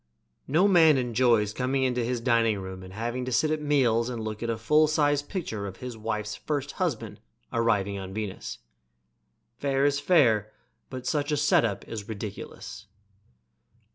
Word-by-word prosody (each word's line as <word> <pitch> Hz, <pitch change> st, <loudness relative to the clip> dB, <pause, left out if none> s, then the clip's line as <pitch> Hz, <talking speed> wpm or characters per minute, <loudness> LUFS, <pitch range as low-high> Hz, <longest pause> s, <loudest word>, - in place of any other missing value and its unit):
No 165 Hz, +8 st, +4 dB
man 165 Hz, -6 st, +6 dB
enjoys 120 Hz, -4 st, +2 dB
coming 130 Hz, +2 st, 0 dB
into 125 Hz, -2 st, 0 dB
his 120 Hz, +1 st, -1 dB
dining 115 Hz, -3 st, +2 dB
room 95 Hz, -1 st, -7 dB
and 95 Hz, 0 st, -11 dB
having 120 Hz, +4 st, -3 dB
to 130 Hz, -, -4 dB
sit 155 Hz, +5 st, +2 dB
at 155 Hz, -1 st, -1 dB
meals 125 Hz, -6 st, +2 dB
and 120 Hz, -2 st, -4 dB
look 110 Hz, -1 st, -5 dB
at 115 Hz, -, -2 dB
a 115 Hz, -, -1 dB
full 150 Hz, +7 st, +4 dB
sized 145 Hz, -1 st, +1 dB
picture 110 Hz, -, -4 dB
of 95 Hz, -, -8 dB
his 125 Hz, -2 st, -7 dB
wife's 110 Hz, -1 st, -3 dB
first 145 Hz, -2 st, -3 dB
husband -, -, -2 dB, 0.3 s
arriving 105 Hz, -4 st, +1 dB
on 95 Hz, 0 st, -7 dB
Venus. 105 Hz, -1 st, -5 dB, 1.0 s
Fair's 140 Hz, 0 st, +1 dB
fair, 120 Hz, -, +3 dB, 0.4 s
but 130 Hz, -1 st, -7 dB
such 145 Hz, +1 st, 0 dB
a 150 Hz, -, +1 dB
set 150 Hz, +1 st, +4 dB
up 105 Hz, -4 st, -2 dB
is 105 Hz, -2 st, -7 dB
ridiculous. 105 Hz, -1 st, -7 dB
120 Hz, 165 wpm, -27 LUFS, 110-145 Hz, 1.0 s, man